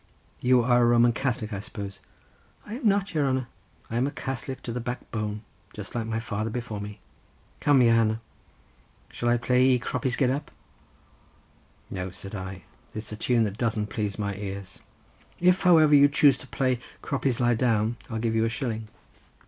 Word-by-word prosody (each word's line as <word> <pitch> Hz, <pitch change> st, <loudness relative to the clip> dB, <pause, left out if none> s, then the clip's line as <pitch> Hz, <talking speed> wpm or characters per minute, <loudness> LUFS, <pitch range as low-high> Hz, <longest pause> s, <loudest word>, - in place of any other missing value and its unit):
"You 125 Hz, -1 st, +4 dB
are 120 Hz, 0 st, +4 dB
a -, -, +5 dB
Roman 120 Hz, 0 st, +5 dB
Catholic, 120 Hz, -4 st, -2 dB
I 100 Hz, -, -3 dB
suppose?" 100 Hz, -1 st, -7 dB, 0.7 s
"I 210 Hz, -, -7 dB
am 255 Hz, -, 0 dB
nat, 200 Hz, -1 st, 0 dB
your 150 Hz, -3 st, +2 dB
hanner—I 130 Hz, -3 st, -5 dB
am 125 Hz, +3 st, +2 dB
a -, -, -3 dB
Catholic 130 Hz, 0 st, -5 dB
to 120 Hz, -, -4 dB
the 125 Hz, -, -2 dB
backbone, 110 Hz, -3 st, -4 dB, 0.3 s
just 105 Hz, -1 st, -8 dB
like 115 Hz, -2 st, -2 dB
my 115 Hz, 0 st, -1 dB
father 110 Hz, -1 st, -3 dB
before 115 Hz, -3 st, -4 dB
me. 105 Hz, +1 st, -7 dB, 0.6 s
Come, 140 Hz, -3 st, +5 dB
your 115 Hz, -1 st, +5 dB
hanner, 110 Hz, -1 st, +2 dB, 0.9 s
shall 120 Hz, -, -1 dB
I 120 Hz, -, +4 dB
play 125 Hz, +1 st, +2 dB
ye 130 Hz, -1 st, +5 dB
'Croppies 125 Hz, +1 st, -2 dB
Get 130 Hz, -2 st, +2 dB
Up'?" 145 Hz, +2 st, -3 dB, 1.4 s
"No," 95 Hz, -1 st, -3 dB
said 100 Hz, +2 st, -9 dB
I; 95 Hz, -2 st, -6 dB, 0.3 s
"It's 110 Hz, 0 st, -5 dB
a -, -, -4 dB
tune 115 Hz, +2 st, +2 dB
that 105 Hz, +1 st, -3 dB
doesn't 110 Hz, -3 st, -1 dB
please 105 Hz, -2 st, -2 dB
my 100 Hz, -2 st, -2 dB
ears. 100 Hz, -2 st, -6 dB, 0.6 s
If, 180 Hz, +1 st, +4 dB
however, 160 Hz, -5 st, +6 dB
you 145 Hz, 0 st, +7 dB
choose 140 Hz, 0 st, +5 dB
to -, -, -10 dB
play 130 Hz, -2 st, 0 dB, 0.2 s
'Croppies 135 Hz, -3 st, -1 dB
Lie 120 Hz, -1 st, +3 dB
Down,' 115 Hz, -1 st, +1 dB
I'll 115 Hz, -, -3 dB
give 110 Hz, 0 st, 0 dB
you 110 Hz, 0 st, +2 dB
a -, -, +1 dB
shilling." 115 Hz, -3 st, -3 dB
120 Hz, 180 wpm, -26 LUFS, 110-130 Hz, 1.4 s, you